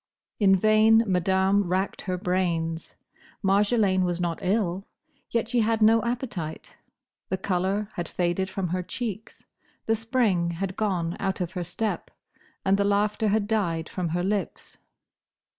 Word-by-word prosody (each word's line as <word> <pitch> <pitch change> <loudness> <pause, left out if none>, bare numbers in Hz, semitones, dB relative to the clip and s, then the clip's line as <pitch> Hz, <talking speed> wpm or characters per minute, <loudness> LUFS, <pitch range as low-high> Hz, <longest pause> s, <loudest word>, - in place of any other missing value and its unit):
In 195 -2 +5
vain 215 +3 +5
Madame 190 +1 +2
racked 185 +3 -1
her 185 -2 -3
brains. 170 -3 -1 0.5
Marjolaine 200 -1 +3
was 175 -1 -1
not 170 -2 -2
ill; 190 -1 0 0.4
yet 230 -1 0
she 240 +1 +1
had 225 0 +2
no 225 +1 +5
appetite; 230 - -4 0.6
the 190 - 0
colour 190 +2 -1
had 175 -2 -4
faded 180 +3 -1
from 185 -2 -3
her 180 +2 -1
cheeks; 220 +2 -6 0.4
the 225 - +2
spring 225 -6 +1
had 185 +2 -4
gone 180 -6 -1
out 190 -1 -1
of 175 -2 -2
her 180 -2 -3
step; 210 +5 -3 0.6
and 195 0 +4
the 200 - +2
laughter 205 +2 +1
had 210 0 +2
died 170 -7 0
from 180 -3 -3
her 175 +2 -1
lips. 195 -1 -3
190 Hz, 145 wpm, -26 LUFS, 180-215 Hz, 0.6 s, In